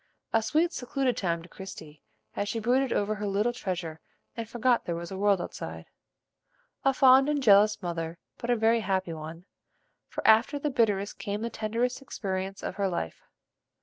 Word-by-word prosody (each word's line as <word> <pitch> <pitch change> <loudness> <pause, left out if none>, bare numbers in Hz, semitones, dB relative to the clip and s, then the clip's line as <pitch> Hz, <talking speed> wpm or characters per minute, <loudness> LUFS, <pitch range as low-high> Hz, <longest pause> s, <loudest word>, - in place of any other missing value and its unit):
A 225 - +4
sweet, 320 +9 +1
secluded 255 0 -1
time 170 -5 -1
to - - -12
Christie, 160 -6 -10 0.3
as 205 - -2
she 225 - -2
brooded 250 +4 +2
over 205 +1 +1
her 210 0 -4
little 210 +5 +1
treasure 175 -7 -4 0.4
and 230 -2 -5
forgot 240 +1 +2
there 170 - -2
was 170 +1 -6
a - - -4
world 200 -1 +3
outside. - - -6 1.0
A 270 - +5
fond 265 +1 +6
and 290 -2 0
jealous 205 -1 +5
mother, 165 -1 -3 0.2
but 240 - -5
a 245 - +4
very 225 +1 +3
happy 190 -4 -1
one, 160 +2 -8 0.6
for - - -6
after 225 +6 +5
the 290 +1 -2
bitterest 205 -5 +1
came 205 +2 -3
the 235 - -3
tenderest 230 +5 -1
experience 195 -6 -4
of - - -4
her 200 -1 +1
life. 170 - -3
210 Hz, 180 wpm, -28 LUFS, 185-240 Hz, 1.0 s, fond